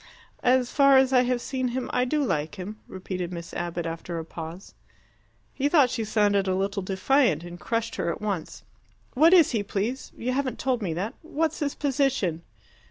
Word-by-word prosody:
"As 250 -1 +3
far 275 -1 +6
as 265 0 +4
I 250 - +6
have 250 0 0
seen 260 0 -2
him, 250 +1 -3
I 250 - +2
do 295 +3 0
like 155 - -1
him," 205 +3 -7
repeated 185 -1 -5
Miss 170 -1 -7
Abbott, 170 -1 -3
after 165 +1 -5
a 165 - -4
pause. 165 +3 -8 0.8
He 285 +1 0
thought 290 -6 +5
she 235 -3 -2
sounded 205 -2 +2
a 185 - +1
little 195 +1 -1
defiant, 190 - +2
and 175 0 -9
crushed 230 0 -2
her - - -1
at 170 - -3
once. 200 -6 -4 0.5
"What 315 +6 +5
is 350 -5 +6
he, 225 -4 0
please? 210 +6 -3
You 250 +2 -2
haven't 260 0 -1
told 255 -3 0
me 175 -6 -2
that. 195 +6 -3
What's 320 -1 -2
his 285 -2 -2
position?" 270 - 0
225 Hz, 190 wpm, -26 LUFS, 185-265 Hz, 0.8 s, far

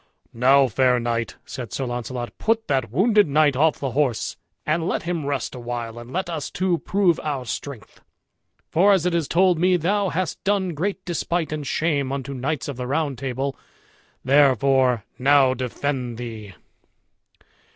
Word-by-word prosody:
"Now, 135 +3 +5
fair 125 +1 +2
knight," 115 -1 -2
said 120 -5 -7
Sir 135 - -3
Launcelot, 120 0 -5
"put 225 0 0
that 130 -5 0
wounded 205 - +3
knight 145 -1 +3
off 155 +3 +3
the 135 -2 -3
horse, 130 -4 0 0.3
and 160 +2 0
let - - -1
him 170 -4 -3
rest 140 -2 -2
awhile, 120 -2 -5
and 120 +1 -11
let 185 +3 -2
us 160 -4 -4
two 180 -3 0
prove 185 -4 +1
our 140 -4 -3
strength. 125 0 -7 0.7
For, 195 +5 +5
as 185 -3 +1
it 180 - +1
is 165 -4 0
told 180 -1 +3
me, 180 +1 +3
thou 195 +4 +1
hast 180 +1 -3
done 195 -2 +1
great 190 +5 -3
despite 170 -1 -2
and 150 -2 -4
shame 145 -5 0
unto 140 0 -4
knights 135 +3 -3
of 140 -4 -5
the 125 -1 -4
Round 145 0 -1
Table, 135 +1 -3 0.7
therefore 130 -3 +3
now 135 0 +5
defend 125 -1 -3
thee." 110 -5 -8
140 Hz, 160 wpm, -23 LUFS, 125-170 Hz, 0.7 s, Now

